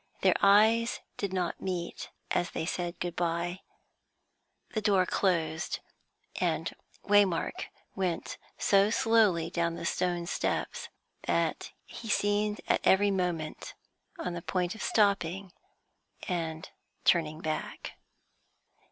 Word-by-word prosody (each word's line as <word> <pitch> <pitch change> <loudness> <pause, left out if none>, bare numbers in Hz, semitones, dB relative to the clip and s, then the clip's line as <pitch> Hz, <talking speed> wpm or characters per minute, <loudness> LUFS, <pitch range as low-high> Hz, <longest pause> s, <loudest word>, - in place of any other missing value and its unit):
Their - - +5
eyes 220 +4 +5 0.2
did 200 -2 -3
not 180 -3 -2
meet 180 -3 -4 0.2
as 175 - +1
they - - -3
said 175 0 -3
good 175 -1 -3
bye. 175 +1 -1 1.1
The 215 - 0
door 195 -3 +3
closed, 165 -4 0 0.6
and - - 0 0.3
Waymark 205 -4 +3 0.3
went 185 -4 -2 0.2
so 200 +1 +4
slowly 215 -7 +3
down 170 -1 0
the 170 - -6
stone 175 -1 0
steps 470 - -2 0.4
that - - 0
he 225 - -9
seemed 210 0 +1
at - - +2
every 200 +1 +5
moment 175 -5 -2 0.4
on 180 - -3
the 170 - -5
point 180 0 -1
of 220 - -9
stopping 195 -3 +1 0.8
and 160 -3 -3 0.4
turning 155 -3 +3
back. 155 -2 -4
180 Hz, 115 wpm, -30 LUFS, 170-205 Hz, 1.1 s, Their